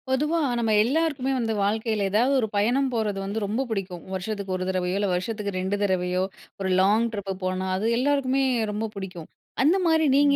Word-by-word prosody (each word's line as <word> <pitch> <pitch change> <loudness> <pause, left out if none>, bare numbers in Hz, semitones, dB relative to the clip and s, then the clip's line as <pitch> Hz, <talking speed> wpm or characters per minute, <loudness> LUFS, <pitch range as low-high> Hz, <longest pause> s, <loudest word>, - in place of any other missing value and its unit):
பொதுவா 300 +5 +1 0.2
நம்ம 225 -2 +1
எல்லாருக்குமே 275 0 0
வந்து 225 -3 0
வாழ்க்கையில 215 0 0
ஏதாவது 240 +7 +3
ஒரு 225 - 0
பயணம் 245 +7 +2
போறது 215 -4 -1
வந்து 205 +3 -3
ரொம்ப 215 +6 -1
புடிக்கும் 190 -5 -4
வருஷச்சுக்கு 190 0 -3
1 185 - -2
தரவையோ 185 -1 -1
இல்ல 200 -1 0
வருஷச்சுக்கு 205 +3 -2
2 190 +2 -1
தரவையோ 185 -1 +1 0.4
ஒரு 190 - -1
லாங் 210 +4 +4
ட்ரிப் 200 -2 -4
போனா 185 0 -1
அது 195 +3 -2
எல்லாருக்குமே 270 0 +2 0.3
ரொம்ப 210 +2 -2
புடிக்கும். 185 -4 -7 0.3
அந்த 325 +7 +4
மாரி 320 -1 +3
நீங்க 285 0 +5
210 Hz, 175 wpm, -25 LUFS, 190-255 Hz, 0.4 s, நீங்க